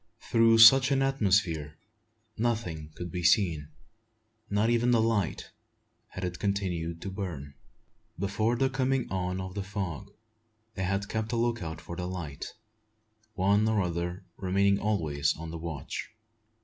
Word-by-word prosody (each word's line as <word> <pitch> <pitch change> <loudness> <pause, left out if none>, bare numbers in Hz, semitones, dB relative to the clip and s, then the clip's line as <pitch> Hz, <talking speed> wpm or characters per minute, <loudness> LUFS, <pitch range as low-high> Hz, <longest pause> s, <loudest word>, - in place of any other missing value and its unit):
Through 115 -1 +5
such 130 +4 +9
an 135 -1 +2
atmosphere 95 - +1 0.6
nothing 110 -10 -2
could 90 -1 -6
be 90 - -3
seen, 85 -5 +3 0.8
not 105 +2 +2
even 120 +1 +2
the 120 -2 +4
light, 110 -6 0 0.6
had 90 - -8
it 90 -1 -5
continued 90 -5 -2
to 95 - -4
burn. 85 -8 -6 0.6
Before 105 +5 0
the 135 +3 +2
coming 130 -1 0
on 90 0 -2
of 95 0 -5
the 100 - -3
fog, 100 -1 -5 0.6
they 95 - -2
had 100 +1 -1
kept 110 +1 -3
a - - +1
look 115 -1 0
out 80 -1 -5
for 85 - -8
the 90 +1 -4
light, 85 -6 -6 0.8
one 100 +3 +3
or 110 -1 +2
other 90 0 -2
remaining 100 +1 +2
always 80 -9 0
on 80 0 -7
the 85 - -6
watch. 80 -4 -5
95 Hz, 150 wpm, -29 LUFS, 85-110 Hz, 0.8 s, such